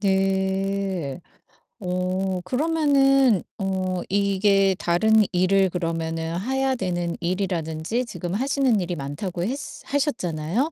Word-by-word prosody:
네. 190 -4 0 0.6
어 185 0 -1
그러면은 275 - +3 0.2
어 185 -2 -1
이게 195 0 +3
다른 175 +6 +2 0.2
일을 190 +1 +3
그러면은 165 -1 -2
해야 265 +4 0
되는 175 -6 -2
일이라든지 175 +3 -2
지금 180 -6 -5
하시는 260 0 +2
일이 175 0 -3
많다고 165 +5 -4
했 235 +8 -1 0.3
하셨잖아요? 240 - -1
190 Hz, 235 characters per minute, -24 LUFS, 175-220 Hz, 0.6 s, 그러면은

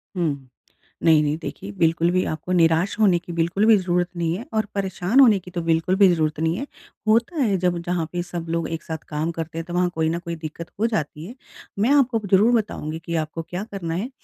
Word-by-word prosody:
हुँ। 145 -7 -2 0.6
नहीं, 160 -2 +6
नहीं, 150 +1 0
देखिए, 100 -9 -7
बिल्कुल 165 - +2
भी 185 0 +2
आपको 160 +3 -5
निराश 165 +2 +3
होने 190 -5 +5
की 175 0 -10
बिल्कुल 170 +5 +1
भी 225 - +7
ज़रूरत 180 -2 0
नहीं 165 -1 0
है 235 - -8
और 215 -1 +1
परेशान 190 +4 +1
होने 230 -7 +7
की 180 0 -13
तो 175 - -3
बिल्कुल 165 +3 +1
भी 195 -1 +6
ज़रूरत 155 -2 -1
नहीं 160 +1 +1
है। 275 - -3 0.4
होता 230 +9 +2
है, 205 -7 +2
जब 180 -1 0
जहाँ 175 -1 -1
पे 175 0 -2
सब 175 -2 -6
लोग 165 -1 -1
एक 165 -1 -5
साथ 160 - -4
काम 155 +2 -2
करते 165 0 -6
हैं, 165 - -3
तो 175 - -8
वहाँ 180 0 +2
कोई 160 0 +1
ना 170 - -1
कोई 170 -1 -5
दिक्कत 160 +1 -7
हो 225 - +3
जाती 155 -7 -3
है। 235 +7 -9 0.4
मैं 220 - +3
आपको 250 -5 +3
ज़रूर 210 +5 +5
बताऊँगी 160 -8 -2
कि 170 -1 -3
आपको 155 +1 -2
क्या 180 +4 -5
करना 170 -5 -4
है, 205 +9 -3
170 Hz, 230 wpm, -23 LUFS, 160-195 Hz, 0.6 s, भी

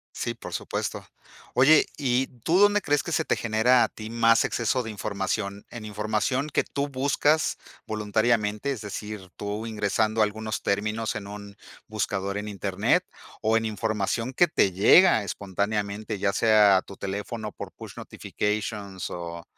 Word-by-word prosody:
Sí, - - -2
por - - -9
supuesto. - - -3 0.5
Oye, 145 +5 +6
y 130 -2 +1 0.2
¿tú 170 +3 +3
dónde 205 0 +5
crees 145 -2 +1
que 170 - -5
se 160 - +1
te - - +1
genera 120 +3 +3
a - - +2
ti 110 0 -9
más 115 0 +4
exceso 120 +2 0
de 115 - -6
información? 100 -1 -3
¿En 115 -3 -8
información 110 +7 -1
que - - +2
tú 140 0 -3
buscas, 145 +3 +1 0.3
voluntariamente, 110 +2 0
es 125 - -4
decir, 105 -2 -7
tú 105 +2 -4
ingresando 110 0 +1
algunos 110 +2 -3
términos 110 +3 -1
en 105 -2 -5
un 100 0 -9 0.3
buscador 100 -2 -2
en 105 +1 -4
Internet 100 -3 0 0.4
o 110 +1 +3
en 115 - -1
información 110 +3 -2
que 175 +5 +4
te 100 -10 +2
llega 110 - +6
espontáneamente, 100 +2 -3
ya 100 0 0
sea 105 -3 +5
a 95 - +1
tu 100 - -12
teléfono 105 +3 -4
por - - -8
push - - -10
notifications 105 -2 -4
o 85 -1 -6
110 Hz, 155 wpm, -26 LUFS, 100-120 Hz, 0.5 s, Oye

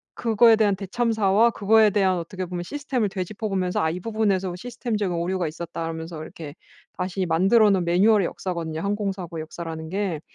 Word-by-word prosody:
그거에 230 0 +5
대한 205 -3 +3
대참사와 220 +1 +2
그거에 220 0 +4
대한 190 -2 +2
어떻게 185 +2 -5
보면 175 0 -5
시스템을 260 -2 -2
되짚어 200 +3 -4
보면서 185 -2 0
"아 160 0 +1
이 180 - -4
부분에서 195 -4 0
시스템적인 215 -3 -3
오류가 175 0 -1
있었다."라면서 165 0 -6
이렇게 155 -3 -9 0.4
다시 185 +1 -2
만들어 195 +7 +4
놓은 185 -2 +2
매뉴얼의 195 +3 +4
역사거든요, 165 -4 -4
항공 200 0 -1
사고의 170 -4 -6
역사라는 160 0 -7
게. 185 -4 -2
190 Hz, 455 characters per minute, -24 LUFS, 170-215 Hz, 0.4 s, 그거에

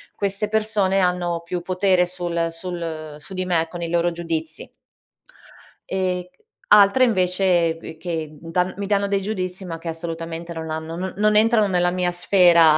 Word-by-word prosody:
queste 200 +1 -1
persone 210 -3 +1
hanno 180 -2 0
più 175 +1 -4
potere 185 0 +2
sul 175 -2 -2
sul 165 -3 -6
su 150 +6 -10
di 185 0 -2
me 165 -2 +1
con 175 0 -7
i 170 - -2
loro 170 0 +1
giudizi. 165 -2 -4 1.2
Ehm, 185 -1 -1
c 180 - -26 0.3
altre 210 +5 +6
invece 180 -5 +2
b 165 -1 -10
che 160 -2 -4
d 165 +1 -10
dan 180 +2 0
mi 200 - -3
danno 200 0 +1
dei 200 0 0
giudizi, 190 -2 -4
ma 165 -2 -5
che 165 0 -6
assolutamente 165 0 -5
non 160 -1 -6
hanno 160 +1 -4
n 185 +2 -4
non 210 0 +3
entrano 220 -1 +4
nella 175 -1 +2
mia 180 0 0
sfera, 175 -3 +5
180 Hz, 175 wpm, -22 LUFS, 165-190 Hz, 1.2 s, altre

